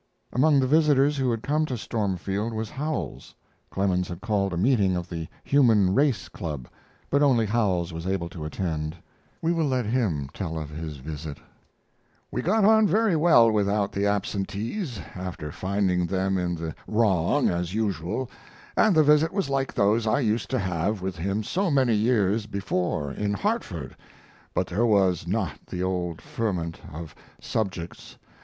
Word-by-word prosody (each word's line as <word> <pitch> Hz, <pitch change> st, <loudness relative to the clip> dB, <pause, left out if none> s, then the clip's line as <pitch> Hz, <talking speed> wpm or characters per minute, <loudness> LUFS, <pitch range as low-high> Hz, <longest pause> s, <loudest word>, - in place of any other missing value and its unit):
] -, -, -26 dB
Among 140 Hz, +2 st, +4 dB
the 130 Hz, -, +3 dB
visitors 145 Hz, 0 st, +4 dB
who 130 Hz, -2 st, +1 dB
had 115 Hz, -2 st, -2 dB
come 150 Hz, +3 st, +1 dB
to 125 Hz, -, -3 dB
Stormfield 105 Hz, 0 st, -2 dB
was 110 Hz, -1 st, -4 dB
Howells. 140 Hz, -, -4 dB, 0.3 s
Clemens 90 Hz, -2 st, 0 dB
had 85 Hz, -3 st, -6 dB
called 100 Hz, -3 st, 0 dB
a 85 Hz, -, -3 dB
meeting 100 Hz, -3 st, +3 dB
of 90 Hz, 0 st, -3 dB
the 80 Hz, -2 st, -5 dB, 0.2 s
Human 110 Hz, -9 st, +4 dB
Race 140 Hz, -2 st, +2 dB
Club, 75 Hz, -7 st, -6 dB, 0.4 s
but 140 Hz, -, +3 dB
only 125 Hz, -6 st, +4 dB
Howells 95 Hz, -6 st, 0 dB
was 85 Hz, +2 st, -5 dB
able 95 Hz, -3 st, -1 dB
to 80 Hz, -2 st, -8 dB
attend. 75 Hz, -1 st, -3 dB, 0.5 s
We 165 Hz, -, +2 dB
will 165 Hz, -3 st, +1 dB
let 130 Hz, -3 st, 0 dB
him 105 Hz, -, 0 dB
tell 80 Hz, -5 st, -4 dB
of 75 Hz, -2 st, -5 dB
his 80 Hz, -1 st, -6 dB
visit: 75 Hz, +1 st, -6 dB, 0.9 s
We 125 Hz, -, -1 dB
got 200 Hz, -, +3 dB
on 220 Hz, 0 st, +6 dB
very 215 Hz, 0 st, +3 dB
well 150 Hz, -8 st, +6 dB
without 100 Hz, -1 st, +1 dB
the 100 Hz, +1 st, 0 dB
absentees, 105 Hz, -, -2 dB
after 90 Hz, -5 st, -6 dB
finding 95 Hz, -1 st, 0 dB
them 95 Hz, +2 st, 0 dB
in 90 Hz, -1 st, 0 dB
the 80 Hz, -1 st, -5 dB
wrong, 105 Hz, -, +2 dB
as 90 Hz, +2 st, -2 dB
usual, 105 Hz, +3 st, -1 dB, 0.5 s
and 215 Hz, -5 st, +4 dB
the 155 Hz, -, +6 dB
visit 150 Hz, +2 st, +4 dB
was 190 Hz, -8 st, -1 dB
like 135 Hz, -1 st, 0 dB
those 110 Hz, +3 st, +2 dB
I 110 Hz, +6 st, +2 dB
used 110 Hz, -1 st, 0 dB
to 130 Hz, -, 0 dB
have 95 Hz, 0 st, -1 dB
with 95 Hz, -2 st, -3 dB
him 100 Hz, +5 st, -1 dB
so 190 Hz, -, 0 dB
many 130 Hz, -5 st, +3 dB
years 105 Hz, -1 st, +2 dB
before 90 Hz, -7 st, -2 dB
in 105 Hz, +7 st, -2 dB
Hartford, 100 Hz, -, -2 dB, 0.6 s
but -, -, +2 dB
there 105 Hz, +7 st, -1 dB
was 95 Hz, -6 st, +2 dB
not 95 Hz, -6 st, -2 dB
the 90 Hz, -, -3 dB
old 90 Hz, -3 st, -2 dB
ferment 90 Hz, -7 st, -3 dB
of 80 Hz, -1 st, -8 dB, 0.3 s
subjects. 95 Hz, -6 st, -4 dB
100 Hz, 165 wpm, -26 LUFS, 90-125 Hz, 0.9 s, on